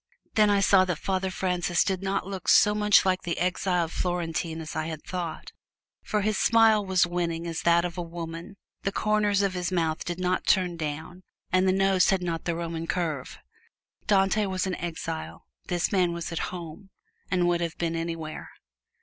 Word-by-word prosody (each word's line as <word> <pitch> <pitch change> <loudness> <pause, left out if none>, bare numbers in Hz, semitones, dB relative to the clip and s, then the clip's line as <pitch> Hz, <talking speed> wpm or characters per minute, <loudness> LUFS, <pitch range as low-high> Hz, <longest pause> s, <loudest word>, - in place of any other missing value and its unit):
Then 215 -1 +4
I 200 -1 +3
saw 195 -1 +5
that 180 -3 -2
Father 190 +2 -1
Francis 180 -1 0
did 190 -2 -1
not 195 -1 -1
look 190 -2 -7
so 210 - +6
much 210 -1 +4
like 185 -1 +1
the 170 - -3
exiled 180 -2 0
Florentine 170 -2 -2
as 160 -1 -7
I 155 - -2
had 160 -2 -6
thought, 175 -3 -5 0.5
for 210 - -1
his 210 0 0
smile 225 -2 +5
was 190 -2 +3
winning 170 -1 -2
as 165 -1 -3
that 170 0 +3
of 175 0 -5
a - - 0
woman, 170 +2 -7 0.2
the 195 - -1
corners 210 -1 +1
of 195 -2 0
his 180 -1 -2
mouth 165 -3 0
did 175 0 -4
not 185 0 -1
turn 180 -3 +3
down, 160 +3 -5 0.3
and 185 +1 +3
the - - +5
nose 195 -1 +3
had 190 -2 +1
not 165 -2 -3
the 170 - -1
Roman 165 -1 -4
curve. 160 -8 -2 0.7
Dante 200 +1 +3
was 185 0 -1
an 190 - -2
exile: 165 -1 -5 0.2
this 175 -1 0
man 180 -3 +2
was 170 0 -5
at 170 - -3
home 180 +2 -8 0.4
and 180 -2 +2
would 175 0 +1
have 170 -1 -3
been, 165 -1 -1
anywhere. 165 -1 -5
180 Hz, 190 wpm, -27 LUFS, 165-190 Hz, 0.7 s, so